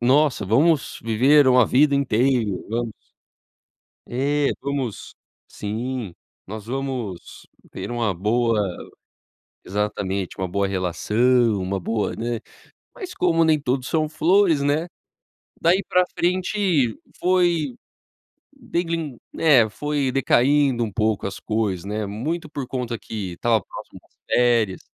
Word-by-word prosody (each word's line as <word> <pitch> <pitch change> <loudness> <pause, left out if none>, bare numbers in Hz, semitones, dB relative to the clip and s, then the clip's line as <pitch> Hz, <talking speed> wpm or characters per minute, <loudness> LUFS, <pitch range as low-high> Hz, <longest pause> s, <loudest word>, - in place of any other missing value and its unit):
"nossa, 130 -2 +3
vamos 145 - +2
viver 130 +6 +4
uma 125 -2 +6
vida 140 +2 +4
inteira, 125 -3 +2 0.2
vamos" 115 0 -2 1.2
é, 140 +3 0 0.2
vamos 135 -5 -4 0.4
sim, 110 -1 -4 0.3
nós 105 +1 -8
vamos 125 -7 -5 0.2
ter - - -6
uma 115 -4 0
boa 110 +4 +1 1.0
exatamente, 100 -1 -2
uma 95 -1 -2
boa 100 +2 0
relação, 105 +5 +1
uma 95 +1 -2
boa, 110 +3 -2
né, 115 0 -3 0.5
mas 370 -3 -8
como 165 -2 +2
nem 155 -2 +3
tudo 130 -1 -1
são 155 -1 0
flores, 165 -1 +3
né, 150 +4 0 0.7
daí 180 +4 +3
pra 180 0 +4
frente 180 - +1 0.2
foi, 175 -7 +1 0.8
degrin 165 -6 -3 0.2
né, 135 -9 +4
foi 145 +3 -2
decaindo 135 0 +3
um 105 - -5
pouco 110 -1 0
as 100 - -5
coisas, 105 -5 -1
né, 105 +1 -3
muito 150 +11 -4
por 140 -4 -5
conta 120 -3 -4
que 100 -5 -6
estava 110 +5 +1
próximo - - -10
das - - -33
férias. 115 -6 +2
125 Hz, 120 wpm, -22 LUFS, 110-150 Hz, 1.2 s, uma